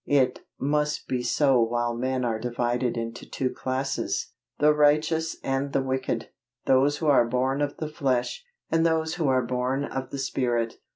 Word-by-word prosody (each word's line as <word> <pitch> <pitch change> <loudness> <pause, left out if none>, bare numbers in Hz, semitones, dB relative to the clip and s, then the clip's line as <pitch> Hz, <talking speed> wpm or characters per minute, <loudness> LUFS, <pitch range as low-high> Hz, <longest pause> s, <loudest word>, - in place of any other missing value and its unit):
It 130 -3 +3 0.2
must 150 +1 0
be 125 -1 -1
so 130 +1 +3
while 120 +1 0
men 130 +1 -1
are 115 -2 -1
divided 120 +1 -1
into 115 0 -5
two 130 -1 -1
classes 130 +1 -2 0.3
the 150 +1 +5
righteous 155 +2 +2
and 135 +1 -1
the 135 - +2
wicked 130 -3 -2 0.4
those 135 +3 +3
who 160 - -4
are 135 -5 +5
born 130 +3 0
of 145 -1 -1
the 155 - -3
flesh, 140 - -1 0.3
and 165 0 +3
those 160 -1 +1
who 160 -4 0
are 130 -2 +2
born 125 +3 -1
of 135 -2 -5
the 140 - -5
Spirit. 120 -4 -1
130 Hz, 170 wpm, -26 LUFS, 125-145 Hz, 0.4 s, the